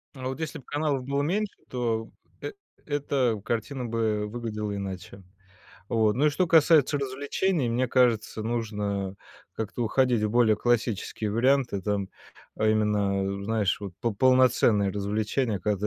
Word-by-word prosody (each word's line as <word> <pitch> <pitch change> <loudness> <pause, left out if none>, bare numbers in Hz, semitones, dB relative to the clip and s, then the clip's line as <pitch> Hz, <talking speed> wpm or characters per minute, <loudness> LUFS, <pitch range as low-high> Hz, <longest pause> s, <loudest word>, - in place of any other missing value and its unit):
А 130 -1 -5
вот 130 +2 -4
если 160 -1 -4
б 130 - -16
каналов 145 -3 -1
было 140 +1 0
меньше, 200 +6 -1 0.2
то 115 -3 -2 0.3
эт 425 - -6 0.3
эта 135 -6 0
картина 120 +4 -3
бы 110 -2 -1
выглядела 105 -2 -4
иначе. 95 0 -7 0.7
Вот, 110 -2 +2
ну 145 +4 +3
и 150 - +4
что 180 +5 +1
касается 160 -3 +5
развлечений, 140 +3 -1
мне 125 +1 0
кажется, 115 -4 +2
нужно 105 -4 -2 0.4
как-то 110 +2 -3
уходить 120 0 +2
в 105 - +1
более 115 -1 +4
классические 115 -2 -1
варианты. 120 -1 +2
Там, 100 -1 -1 0.5
а 110 - +1
именно, 100 -2 +1
знаешь, 105 -2 0
вот 100 -3 -7
по 115 - 0
полноценные 125 -4 +4
развлечения, 105 +3 -1
когда 105 +1 -1
115 Hz, 145 wpm, -27 LUFS, 105-130 Hz, 0.7 s, касается